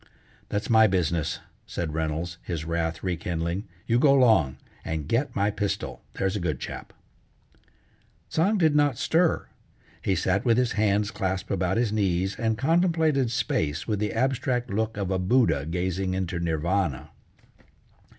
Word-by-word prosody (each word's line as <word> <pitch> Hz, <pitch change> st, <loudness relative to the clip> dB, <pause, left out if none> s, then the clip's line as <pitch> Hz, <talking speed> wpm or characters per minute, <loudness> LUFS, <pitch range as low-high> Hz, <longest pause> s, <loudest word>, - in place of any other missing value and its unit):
"That's 105 Hz, +1 st, -2 dB
my 110 Hz, -1 st, +6 dB
business," 85 Hz, -5 st, 0 dB, 0.3 s
said 80 Hz, -3 st, -3 dB
Reynolds, 80 Hz, +2 st, -3 dB
his 80 Hz, -3 st, -4 dB
wrath 80 Hz, -1 st, -2 dB
rekindling. 85 Hz, +1 st, -2 dB, 0.2 s
"You 120 Hz, +1 st, +2 dB
go 140 Hz, 0 st, +5 dB
'long, 110 Hz, -, +4 dB, 0.3 s
and 80 Hz, -3 st, -3 dB
get 125 Hz, +3 st, 0 dB
my 100 Hz, +1 st, +2 dB
pistol; 100 Hz, -1 st, -3 dB
there's 95 Hz, +1 st, -1 dB
a -, -, -1 dB
good 80 Hz, -7 st, -2 dB
chap." -, -, -7 dB, 1.4 s
Tsang 195 Hz, +7 st, +2 dB
did 160 Hz, -5 st, +3 dB
not 145 Hz, -4 st, +3 dB
stir; 165 Hz, +1 st, +2 dB, 0.6 s
he 95 Hz, -, +1 dB
sat 95 Hz, +3 st, +1 dB
with 115 Hz, -2 st, +3 dB
his 125 Hz, -2 st, +2 dB
hands 105 Hz, -1 st, +1 dB
clasped 95 Hz, -1 st, -3 dB
about 95 Hz, 0 st, 0 dB
his 115 Hz, -3 st, +1 dB
knees, 95 Hz, -2 st, 0 dB
and 110 Hz, -1 st, 0 dB
contemplated 160 Hz, -3 st, +2 dB
space 80 Hz, -8 st, -1 dB
with 105 Hz, -2 st, 0 dB
the 105 Hz, 0 st, -1 dB
abstract 125 Hz, 0 st, 0 dB
look 110 Hz, +1 st, -1 dB
of 100 Hz, -2 st, -2 dB
a 95 Hz, -, +1 dB
Buddha 90 Hz, -, +2 dB
gazing 95 Hz, +2 st, -1 dB
into 95 Hz, -2 st, -2 dB
Nirvana. 80 Hz, -3 st, -1 dB
100 Hz, 150 wpm, -26 LUFS, 85-120 Hz, 1.4 s, my